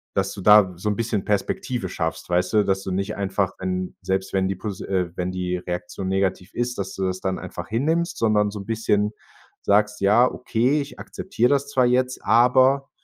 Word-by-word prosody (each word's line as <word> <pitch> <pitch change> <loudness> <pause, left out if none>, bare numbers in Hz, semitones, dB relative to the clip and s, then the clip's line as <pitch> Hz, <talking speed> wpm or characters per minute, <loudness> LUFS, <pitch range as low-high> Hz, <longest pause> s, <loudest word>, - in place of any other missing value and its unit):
dass 95 0 0
du 100 - -8
da 105 -2 +6
so 105 +5 -2
'n 105 - 0
bisschen 115 -4 -1
Perspektive 105 +1 -1
schaffst, 80 -1 -4
weißt 90 +3 +1
du, 105 -2 +4
dass 95 -1 0
du 95 - -4
nicht 100 +3 -2
einfach 95 -1 -1
'n 95 0 -3
selbst, 95 0 -2
wenn 95 -1 +1
die 95 - -2
Posi 100 0 -6
äh, 90 -3 -1
wenn 90 0 -2
die 90 -1 -2
Reaktion 90 +1 -5
negativ 95 -1 -1
ist, 120 0 -2
dass 95 -1 -4
du 95 - -3
das 95 0 -2
dann 95 -1 -1
einfach - - -7
hinnimmst, 165 +9 0
sondern 105 -2 +2
so 105 - -6
'n 100 - -8
bisschen 105 -2 0 0.5
sagst: 105 +1 +2
„Ja, 105 +6 +5
okay, 125 +4 0
ich 140 - -9
akzeptiere 125 -10 -1
das 140 0 +1
zwar 130 -3 +3
jetzt, 125 +1 +1
aber 130 +3 +4
105 Hz, 205 wpm, -23 LUFS, 95-120 Hz, 0.5 s, da